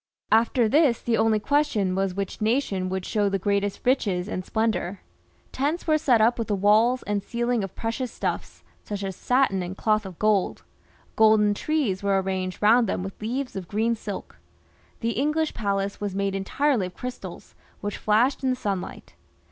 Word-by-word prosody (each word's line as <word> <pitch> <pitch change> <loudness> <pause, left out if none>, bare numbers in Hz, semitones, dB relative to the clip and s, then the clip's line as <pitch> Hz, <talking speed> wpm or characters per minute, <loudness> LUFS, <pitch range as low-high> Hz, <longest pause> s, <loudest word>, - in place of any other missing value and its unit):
After 230 +1 +4
this 280 -1 +3
the 235 - 0
only 220 -1 +3
question 215 -8 +1
was 190 -1 -1
which 200 +2 -4
nation 215 -5 0
would 190 0 -3
show 205 -2 +1
the 195 - 0
greatest 200 +1 -1
riches 205 -8 +1
and 185 -3 -4
splendour. 215 -3 -1 0.5
Tents 295 +6 -1
were 310 -1 +3
set 250 -6 +3
up 235 +2 +3
with 230 - -2
the 205 - 0
walls 215 +6 +3
and 205 -1 -1
ceiling 240 0 -1
of 195 - -6
precious 230 +2 -3
stuflfs, - - -4 0.2
such 205 -1 -5
as 190 -1 -4
satin 250 -6 +1
and 180 +2 -5
cloth 215 -2 +1
of 180 -3 -11
gold; 210 -3 +1 0.5
golden 215 -1 +5
trees 250 -6 -1
were 200 -1 +2
arranged 185 0 -3
round 225 +1 +5
them 180 - -1
with 195 +2 -8
leaves 250 +4 -3
of 190 -3 -5
green 220 +3 +1
silk; 210 -3 -7 0.6
the 230 0 0
English 300 +5 0
palace 200 -1 -2
was 200 -2 -3
made 200 0 0
entirely 210 +3 0
of 180 - -13
crystals, 250 0 -8 0.3
which 205 0 -3
flashed 235 +7 +2
in 260 - +2
the 255 - +1
sun 200 -6 -2
light. - - -10
215 Hz, 180 wpm, -25 LUFS, 195-245 Hz, 0.6 s, golden